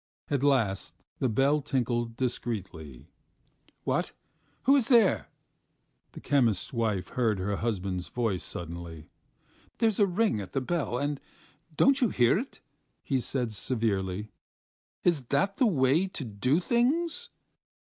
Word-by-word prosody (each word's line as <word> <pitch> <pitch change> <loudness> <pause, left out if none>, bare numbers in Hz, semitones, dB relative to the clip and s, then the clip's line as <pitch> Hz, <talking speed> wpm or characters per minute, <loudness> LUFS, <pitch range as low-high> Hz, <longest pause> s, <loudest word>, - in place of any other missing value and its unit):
At 140 -2 +1
last 120 -9 +1 0.2
the 130 - +1
bell 140 +6 +2
tinkled 120 -4 -1
discreetly. 95 - -4 0.7
"What? - - -1 0.5
Who 275 +2 +5
is 260 -5 +3
there?" 230 -7 +4 0.9
the - - -9
chemist's 120 -9 +1
wife 110 -6 -1
heard 115 -5 +1
her 100 +2 -2
husband's 95 -5 -2
voice 115 -7 -1
suddenly. 85 -2 -7 0.7
"There's 225 -3 +1
a 205 - +5
ring 185 - +1
at 95 - -9
the 135 - +1
bell, 140 -3 -1
and 145 +1 -2 0.5
you 155 - -25
don't 270 -4 +3
hear 120 +8 +4
it," 265 +4 -8 0.4
he 135 -3 0
said 125 -2 -2
severely. 105 -3 -1 0.7
"Is 160 -7 +2
that 145 +11 0
the 255 - +4
way 150 +1 +3
to 165 -7 -6
do 125 - +1
things?" 315 - +1
125 Hz, 130 wpm, -28 LUFS, 105-175 Hz, 0.9 s, Who